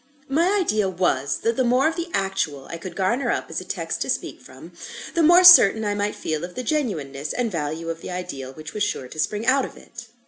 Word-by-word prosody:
My 340 +9 +2
idea 215 - 0
was, 140 -7 0
that 230 0 0
the 260 - +2
more 250 +4 +3
of 325 - -1
the 340 0 -4
Actual 190 - -2
I 170 - -6
could 180 +2 -9
garner 230 +8 0
up - - -2
as - - -3
a - - -8
text - - -4
to - - -2
speak - - -3
from, - - -14 0.4
the 335 - +1
more 345 +3 +6
certain 220 - +8
I 205 - 0
might 205 0 -2
feel 155 0 -4
of 180 0 -7
the 255 - -4
genuineness 155 - -3
and 240 -3 -2
value 160 0 -4
of 165 0 -5
the - - -8
Ideal 140 -8 -6
which 155 +2 -10
was 210 - -5
sure 205 -10 -2
to 155 - -11
spring 210 +7 -1
out 265 +2 +3
of - - -8
it. 235 0 -12
205 Hz, 240 wpm, -23 LUFS, 160-255 Hz, 0.4 s, certain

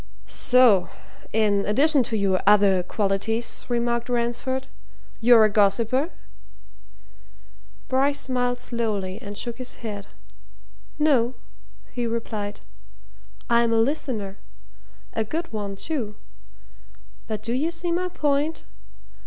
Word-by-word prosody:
"So 240 -8 +4 0.4
in 205 -2 +2
addition 280 +7 +4
to 225 - -1
your 195 -2 +1
other 200 -3 +5
qualities," 205 +4 -1
remarked 235 0 0
Ransford, 245 +2 -1 0.5
"you're 230 -1 +7
a 215 - +5
gossiper?" 220 - +2 1.8
Bryce 275 +2 +1
smiled 245 -1 -1
slowly 210 -7 -2
and 205 0 -7
shook 235 0 -4
his 255 - -5
head. 205 -2 -5 0.9
"No," 260 -5 +2 0.6
he 245 -2 -2
replied. 220 - -4 0.9
"I'm 235 0 +3
a 225 - +3
listener. 225 -6 -1 0.7
A 220 - 0
good 320 +6 -4
one, 205 -2 -4
too. 225 -3 -4 1.1
But 215 -1 -4
do 230 +1 -2
you 285 +6 0
see 340 +1 -3
my 360 +2 0
point? 300 -1 0
235 Hz, 110 wpm, -24 LUFS, 210-260 Hz, 1.8 s, you're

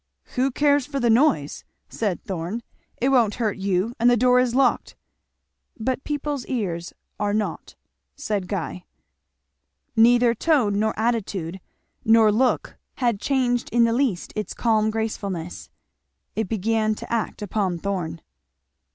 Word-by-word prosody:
"Who 260 +2 +2
cares 285 0 +2
for 280 -2 -3
the 240 -3 +3
noise?" 235 - +2 0.2
said 205 -6 -2
Thorn. 190 +4 -4 0.3
"It 260 - +1
won't 235 -6 +3
hurt 220 -4 -1
you; 195 +3 0
and 240 +2 +5
the 245 - +4
door 250 +1 +4
is 250 -1 +1
locked." 265 -2 +2 0.8
"But 260 +4 -2
people's 290 -2 -3
ears 175 -9 -3 0.3
are 205 0 0
not," 215 -1 -3 0.4
said 210 -10 -2
Guy. 180 -2 -4 1.1
Neither 240 +1 +5
tone 235 -7 +2
nor 220 +1 0
attitude 195 -6 -1 0.4
nor 225 -1 +5
look 245 +4 +1 0.2
had 235 -6 0
changed 250 -3 0
in 235 0 +4
the 230 0 +3
least 235 -8 -1
its 215 -1 -4
calm 220 -2 +2
gracefulness. 200 -6 -4 0.7
It 220 -3 -2
began 220 0 +1
to 230 - -7
act 220 -2 -2
upon 195 -3 -1
Thorn. 170 -3 -3
225 Hz, 135 wpm, -23 LUFS, 200-245 Hz, 1.1 s, and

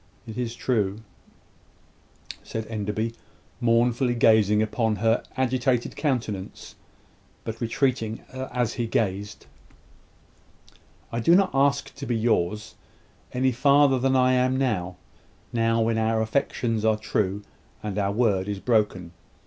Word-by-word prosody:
"It 110 -2 -8
is 120 -2 -3
true," 105 -5 -1 1.4
said 110 0 -5
Enderby, 110 +1 -3 0.5
mournfully 120 +1 +2
gazing 110 -2 +4
upon 110 0 0
her 115 +3 +2 0.2
agitated 130 -1 0
countenance, 115 -10 -3 0.7
but 115 +2 -6
retreating 115 -2 -1
as 125 -3 -2
he 120 -2 -2
gazed. 105 -2 -2 1.7
"I 115 - -2
do 165 +9 +5
not 195 0 +3
ask 140 +1 +1
to 140 0 -8
be 120 - 0
yours, 110 -2 0 0.6
any 130 +1 +1
farther 140 +1 +4
than 135 +1 +2
I 130 0 +4
am 130 +1 +2
now 95 -9 -1 0.6
now 115 0 +2
when 115 0 +1
our 110 0 +1
affections 115 -1 -1
are 110 -1 +3
true, 100 -2 -1 0.4
and 105 -1 -3
our 100 -1 0
word 100 -4 +1
is 100 -1 -3
broken. 105 -7 0
115 Hz, 125 wpm, -25 LUFS, 105-125 Hz, 1.7 s, do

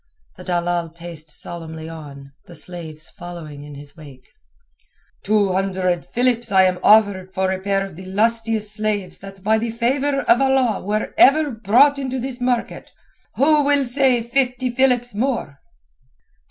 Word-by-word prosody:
The - - -11
dalal 175 -1 -1
paced 165 -1 -10
solemnly 160 0 -8
on, 140 -4 -10 0.2
the 175 - -12
slaves 160 -2 -7
following 165 -5 -9
in 145 0 -10
his 145 0 -12
wake. 140 -5 -14 0.9
"Two 205 -2 +2
hundred 185 -2 -1
philips 240 -2 0
am 185 -2 +4
I - - -21
offered 200 -3 +3
for 190 0 0
a 190 - -2
pair 195 0 0
of 195 -4 -11
the 185 +2 -10
lustiest 220 +1 0
slaves 210 -3 -3
that 195 -1 -12
by 220 +2 +2
the 230 +1 -2
favour 270 +5 0
of 245 - +3
Allah 265 -5 +2
were 210 +2 -2
ever 295 +2 +5
brought 245 +6 +3
into 265 -1 -3
this 255 0 -5
market. 245 -1 -2 0.4
Who 295 +2 +4
will 285 -1 +2
say 250 -1 +3
fifty 250 +1 -1
philips 245 -2 +1
more?" 215 - -2
205 Hz, 155 wpm, -20 LUFS, 175-245 Hz, 0.9 s, ever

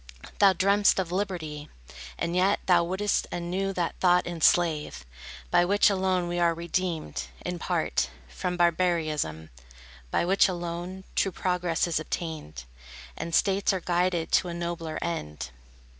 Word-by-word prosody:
Thou 195 -2 +7
dream'st 200 +3 +3
of 185 -3 -1
liberty, 170 -6 -3 0.5
And 170 +1 -2
yet 190 +3 +3
thou 175 -2 +5
wouldst 190 +4 0
anew 180 +3 -2
that 175 -3 -1
thought 180 -1 +4
enslave, 160 - +1 0.5
By - - +5
which 200 +3 +4
alone 185 -2 +1
we 175 0 -2
are 170 -1 +3
redeemed, 170 - -2 0.2
in 180 -1 -3
part, 65 - 0 0.2
From 180 - -4
barbarism; 160 - 0 0.6
by 170 - +1
which 195 +3 +4
alone 175 +1 -5
True 195 - +1
progress 180 -2 0
is 170 -3 0
obtained, 155 - -5 0.5
And 165 -1 -3
states 195 0 +2
are 190 - -1
guided 175 -1 0
to 180 - +3
a 170 - -4
nobler 170 -2 -4
end. 75 - -4
175 Hz, 140 wpm, -27 LUFS, 165-185 Hz, 0.6 s, Thou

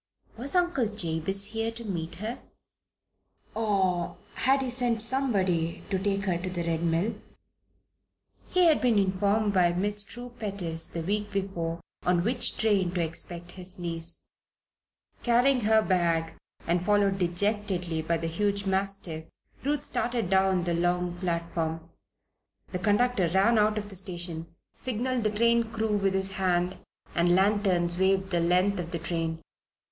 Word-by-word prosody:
Was 270 +8 -3
Uncle 350 -9 +2
Jabez 195 -1 -1
here 225 0 -1
to 230 0 -5
meet 170 -4 -3
her? 220 +5 -5 1.1
Or 190 -6 0 0.2
had 270 +1 +2
he 255 - -2
sent 240 -2 0
somebody 200 -9 +1
to 190 - +1
take 195 0 0
her 180 -3 0
to 185 +1 -4
the 175 -2 -3
Red 165 -1 -1
Mill? 170 +6 +1 1.4
He 365 -1 +4
had 320 -3 +4
been 240 -4 +3
informed 200 +2 +2
by 175 -2 +4
Miss 205 +3 0
True 240 +4 -9
Pettis 180 -6 -3
the 165 - -5
week 205 +3 -1
before 170 -4 -3 0.2
on 175 -1 +2
which 240 +3 +1
train 200 -5 +2
to 175 - +1
expect 170 +1 -4
his 185 +1 0
niece. 170 -1 -3 1.0
Carrying 245 +2 +3
her 220 0 +5
bag 165 -4 +1 0.3
and 170 +1 +1
followed 200 0 +2
dejectedly 180 -2 0
by 165 +1 0
the 165 - -4
huge 200 +4 -1
mastiff, 190 -4 -1 0.4
Ruth 290 +1 0
started 235 -6 -1
down 190 -1 +3
the 170 0 0
long 175 +1 0
platform. 170 -2 -2 0.8
The 180 - -2
conductor 205 0 +2
ran 195 +6 +3
out 210 0 +3
of 205 -1 -4
the 195 - -6
station, 175 -3 -4 0.3
signalled 255 0 -1
the 215 - +2
train 235 +2 +3
crew 220 -2 0
with 195 -1 +1
his 190 0 0
hand, 180 -1 0 0.3
and 175 +1 +3
lanterns 190 -3 +2
waved 190 0 +2
the 175 - +2
length 180 +3 +2
of 170 -1 -4
the 170 - -3
train. 165 -1 -3
190 Hz, 150 wpm, -28 LUFS, 175-215 Hz, 1.4 s, her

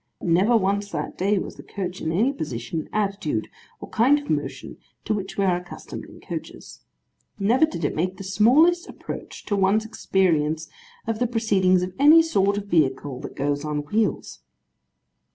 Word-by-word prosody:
Never, 170 - 0 0.2
never 240 - +6
once, 200 0 0
that - - -4
day, 200 +3 +1
was - - -5
the - - -9
coach 185 -2 -6
in 160 - -1
any 225 +11 +2
position, 150 - -5
attitude, 195 - -1 0.3
or - - -8
kind 260 +6 +4
of 290 0 -5
motion - - -3 0.3
to 215 - 0
which 195 -2 -5
we 200 - +2
are 180 -2 +2
accustomed 180 0 -9
in - - -14
coaches. - - -8 0.6
Never 240 +10 +3
did 170 - -4
it - - 0
make 185 +4 -2
the 195 - -7
smallest 270 - +4
approach - - -8
to 205 - 0
one's 200 +3 +2
experience 165 -8 0 0.4
of 225 -1 -2
the 245 - +2
proceedings 195 -6 +2
of 180 0 -4
any 310 +4 +8
sort 200 -10 +1
of 205 - -4
vehicle 140 -7 0
that - - -8
goes 145 +1 -1
on 150 -1 -3
wheels. 210 +7 -1
195 Hz, 175 wpm, -24 LUFS, 165-220 Hz, 0.6 s, any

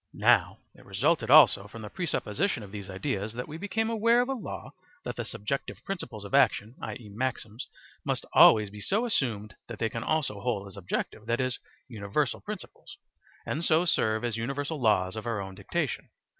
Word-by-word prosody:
Now - - +4 0.2
it - - -17
resulted - - +1
also 100 0 +7
from 110 +2 -10
the 105 - -6
presupposition 145 - -1
of 100 - -11
these 100 -2 -7
ideas 105 +1 -3
that 125 +1 -5
we 155 +2 -7
became 205 +3 -1
aware 230 +2 +4
of 250 - -2
a - - +1
law 250 - -6 0.3
that - - -3
the - - -3
subjective - - -4
principles 120 - -5
of 100 - -9
action, 125 -5 +3
i.e., 120 -5 -6
maxims, 115 -1 -3 0.4
must - - -1
always 105 -2 +7
be 105 - -9
so 215 - +1
assumed 110 - -1
that 115 - -7
they 115 - 0
can 115 +1 -4
also 135 -9 -1
hold 105 -4 -1
as 100 - -10
objective, 100 +3 -4
that 120 0 +1
is, 130 -1 -1 0.3
universal 115 +4 -1
principles, 210 -2 -8 0.5
and 155 - -2
so 165 +1 +4
serve 110 -9 +1
as 115 -2 -1
universal 140 +5 -3
laws 95 -4 +2
of 110 +2 -5
our 115 -3 -1
own 95 -1 -6
dictation. - - -3
115 Hz, 185 wpm, -28 LUFS, 105-150 Hz, 0.5 s, also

